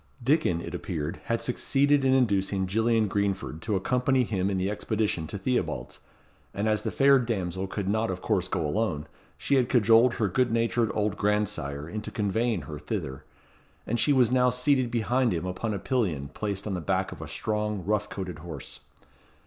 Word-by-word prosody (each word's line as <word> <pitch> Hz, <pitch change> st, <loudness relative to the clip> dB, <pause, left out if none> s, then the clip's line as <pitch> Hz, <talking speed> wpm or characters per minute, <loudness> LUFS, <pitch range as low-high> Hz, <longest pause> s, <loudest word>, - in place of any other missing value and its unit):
Dickon, 130 Hz, -, +2 dB
it -, -, -7 dB
appeared, 80 Hz, -1 st, -4 dB
had 115 Hz, 0 st, -1 dB
succeeded 140 Hz, +3 st, +2 dB
in 130 Hz, -, +3 dB
inducing 100 Hz, -6 st, +1 dB
Gillian 110 Hz, +3 st, +2 dB
Greenford 100 Hz, -5 st, -2 dB
to 105 Hz, +2 st, -1 dB
accompany 125 Hz, +6 st, +2 dB
him 100 Hz, -4 st, -1 dB
in 95 Hz, -, -1 dB
the 95 Hz, +1 st, 0 dB
expedition 105 Hz, -5 st, -1 dB
to 100 Hz, -, -4 dB
Theobalds, 95 Hz, -, -2 dB, 0.6 s
and 100 Hz, +2 st, 0 dB
as 110 Hz, -1 st, +2 dB
the -, -, -2 dB
fair 140 Hz, 0 st, +5 dB
damsel 95 Hz, -6 st, -2 dB
could 95 Hz, 0 st, -4 dB
not 110 Hz, +3 st, +1 dB
of 95 Hz, -1 st, -3 dB
course 90 Hz, 0 st, 0 dB
go 85 Hz, -4 st, -1 dB
alone, 80 Hz, -2 st, -1 dB, 0.3 s
she -, -, -1 dB
had 125 Hz, -1 st, +2 dB
cajoled 115 Hz, +1 st, +5 dB
her 110 Hz, -, +1 dB
good 120 Hz, +6 st, +1 dB
natured 115 Hz, 0 st, +1 dB
old 105 Hz, -1 st, 0 dB
grandsire 100 Hz, -9 st, -1 dB
into 105 Hz, +4 st, -5 dB
conveying 110 Hz, -2 st, 0 dB
her 75 Hz, +2 st, -7 dB
thither; 65 Hz, 0 st, -5 dB, 0.6 s
and 120 Hz, +2 st, -1 dB
she 115 Hz, -, +3 dB
was 125 Hz, -4 st, +4 dB
now 125 Hz, 0 st, +4 dB
seated 125 Hz, 0 st, +2 dB
behind 120 Hz, -1 st, +1 dB
him 85 Hz, -, -3 dB
upon 95 Hz, +5 st, -3 dB
a 100 Hz, -, -1 dB
pillion 90 Hz, -, -1 dB
placed 100 Hz, +4 st, -4 dB
on 105 Hz, -, -2 dB
the 90 Hz, -, -2 dB
back 75 Hz, -, 0 dB
of -, -, -9 dB
a -, -, -6 dB
strong, 105 Hz, -3 st, -2 dB
rough 105 Hz, +1 st, 0 dB
coated, 90 Hz, -5 st, -5 dB
horse. 80 Hz, -5 st, -8 dB
105 Hz, 185 wpm, -27 LUFS, 95-120 Hz, 0.6 s, fair